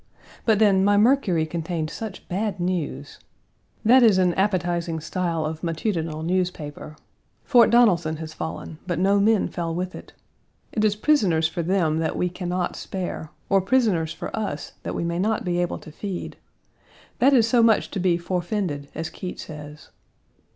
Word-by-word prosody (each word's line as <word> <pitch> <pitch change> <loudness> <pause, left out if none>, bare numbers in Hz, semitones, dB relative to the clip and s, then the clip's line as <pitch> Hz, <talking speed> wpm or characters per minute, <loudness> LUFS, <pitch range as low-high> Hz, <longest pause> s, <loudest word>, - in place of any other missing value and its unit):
But 220 -2 +4
then, 200 -3 +4
my 205 +1 +4
Mercury 210 - +3
contained 160 -1 -3
such 220 -4 -7
bad 200 +2 -2
news. 165 -6 -3 0.7
That 255 +4 +7
is 220 -5 +6
an 180 -2 +3
appetizing 175 -4 0
style 165 0 -2
of 155 0 -4
matutinal 165 -2 -2
newspaper. 165 -4 -3 0.5
Fort 245 -4 +5
Donelson1 180 -10 +4
has 155 0 -7
fallen, 160 0 -6
but 175 -3 -1
no 195 +3 +3
men 210 0 +3
fell 165 -2 -3
with 185 +1 -3
it. - - -11 0.6
It 215 - -1
is 210 -1 +3
prisoners 205 - +2
for 170 +1 -4
them 165 -3 +1
that 160 -1 -1
we 180 - 0
can 180 0 -5
not 180 0 -1
spare, 180 -4 -5 0.2
or 195 -1 +3
prisoners 190 -8 +1
for - - -6
us 205 -8 -4
that - - -5
we - - -2
may 170 0 -2
not 215 +3 0
be 175 -1 0
able 175 -1 -1
to 155 - -12
feed: 190 +3 -5 0.8
that 270 +3 +5
is 235 -5 +5
so 235 +1 +4
much 225 -2 +3
to 200 - -3
be 175 -2 +2
"forefended," 175 -4 -3
as 160 +1 -4
Keitt 180 - -6
says. 150 -1 -9
180 Hz, 170 wpm, -24 LUFS, 160-205 Hz, 0.8 s, That